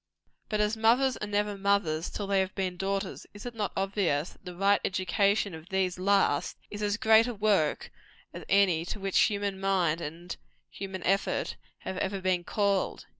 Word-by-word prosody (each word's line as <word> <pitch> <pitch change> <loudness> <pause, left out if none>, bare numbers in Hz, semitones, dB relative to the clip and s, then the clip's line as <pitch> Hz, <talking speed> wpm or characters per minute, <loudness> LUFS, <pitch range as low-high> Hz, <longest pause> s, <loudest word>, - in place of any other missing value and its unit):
But 215 -1 0
as 210 +1 +1
mothers 240 +4 +3
are 210 - -4
never 205 0 0
mothers 195 -5 0
till 205 - -4
they 195 0 +2
have 190 0 -1
been 185 -2 -2
daughters, 195 +2 -3
is 205 - -10
it 245 - -5
not 215 -3 -2
obvious 190 -6 0
that - - -22
the 180 -1 -7
right 200 +2 +3
education 195 +2 +1
of 160 +1 -10
these 185 -2 0
last 195 -6 +2
is 205 - -6
as 205 0 0
great 220 +1 +5
a 245 - -4
work 200 -7 +1 0.4
as - - -8
any 190 -5 +4
to 205 - -5
which 195 -1 +1
human 200 -2 +1
mind 180 -4 +1
and 170 +3 -6 0.4
human 190 -1 -6
effort 195 +1 0 0.3
have 190 - -5
ever 195 0 -2
been 185 -2 0
called? 200 0 0
195 Hz, 180 wpm, -29 LUFS, 185-205 Hz, 0.4 s, great